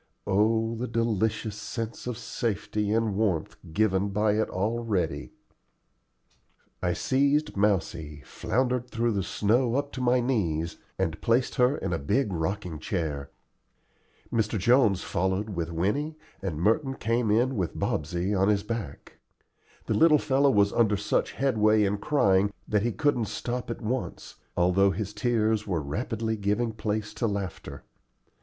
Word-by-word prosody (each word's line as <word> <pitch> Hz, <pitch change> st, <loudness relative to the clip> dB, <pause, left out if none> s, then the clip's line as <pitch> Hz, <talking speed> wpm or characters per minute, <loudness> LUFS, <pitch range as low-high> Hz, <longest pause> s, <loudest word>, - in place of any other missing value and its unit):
Oh 110 Hz, +3 st, +2 dB
the 120 Hz, +2 st, -3 dB
delicious 110 Hz, -2 st, 0 dB
sense 115 Hz, +2 st, -5 dB
of 125 Hz, -3 st, -3 dB
safety 105 Hz, -3 st, -2 dB
and 110 Hz, -2 st, +1 dB
warmth 95 Hz, -7 st, 0 dB, 0.2 s
given 100 Hz, +1 st, +2 dB
by 105 Hz, +2 st, +2 dB
it 110 Hz, +1 st, 0 dB
already! 110 Hz, 0 st, -1 dB, 1.5 s
I 90 Hz, -1 st, +1 dB
seized 140 Hz, -, +1 dB
Mousie, 80 Hz, -7 st, 0 dB
floundered 125 Hz, +1 st, -1 dB
through 115 Hz, 0 st, 0 dB
the 100 Hz, -2 st, 0 dB
snow 115 Hz, +6 st, +1 dB
up 140 Hz, +1 st, -1 dB
to 130 Hz, -, -5 dB
my 125 Hz, 0 st, +3 dB
knees, 85 Hz, -11 st, -1 dB, 0.2 s
and 85 Hz, -4 st, -2 dB
placed 120 Hz, +2 st, +2 dB
her 125 Hz, +4 st, +3 dB
in 95 Hz, -2 st, -3 dB
a 85 Hz, -, -1 dB
big 100 Hz, -, 0 dB
rocking 85 Hz, -1 st, -3 dB
chair. 75 Hz, -4 st, -3 dB, 1.0 s
Mr. 110 Hz, -1 st, +1 dB
Jones 115 Hz, -2 st, +3 dB
followed 95 Hz, +4 st, -1 dB
with 85 Hz, -3 st, -3 dB
Winnie, 125 Hz, -, -1 dB, 0.2 s
and 95 Hz, -6 st, -3 dB
Merton 135 Hz, -, +1 dB
came 115 Hz, 0 st, 0 dB
in 120 Hz, +5 st, +2 dB
with 90 Hz, -6 st, -2 dB
Bobsey 85 Hz, +6 st, -1 dB
on 95 Hz, 0 st, +2 dB
his 100 Hz, -1 st, +2 dB
back. 105 Hz, -10 st, -6 dB, 0.7 s
The -, -, 0 dB
little 160 Hz, -2 st, +6 dB
fellow 140 Hz, -1 st, +2 dB
was 100 Hz, -5 st, +3 dB
under 110 Hz, -3 st, +3 dB
such 100 Hz, -, 0 dB
headway 110 Hz, -5 st, +3 dB
in 100 Hz, 0 st, 0 dB
crying 100 Hz, -6 st, +3 dB, 0.2 s
that 105 Hz, -1 st, +2 dB
he 120 Hz, +3 st, 0 dB
couldn't 145 Hz, -4 st, +1 dB
stop 120 Hz, +4 st, -4 dB
at 115 Hz, -, -5 dB
once, 125 Hz, +4 st, -4 dB, 0.2 s
although 90 Hz, +3 st, +4 dB
his 100 Hz, +1 st, -3 dB
tears 110 Hz, -3 st, +1 dB
were 90 Hz, -4 st, 0 dB
rapidly 110 Hz, -, -2 dB
giving 105 Hz, +3 st, 0 dB
place 105 Hz, -1 st, -3 dB
to 115 Hz, -, -1 dB
laughter. 100 Hz, -3 st, -5 dB
105 Hz, 145 wpm, -27 LUFS, 95-120 Hz, 1.5 s, little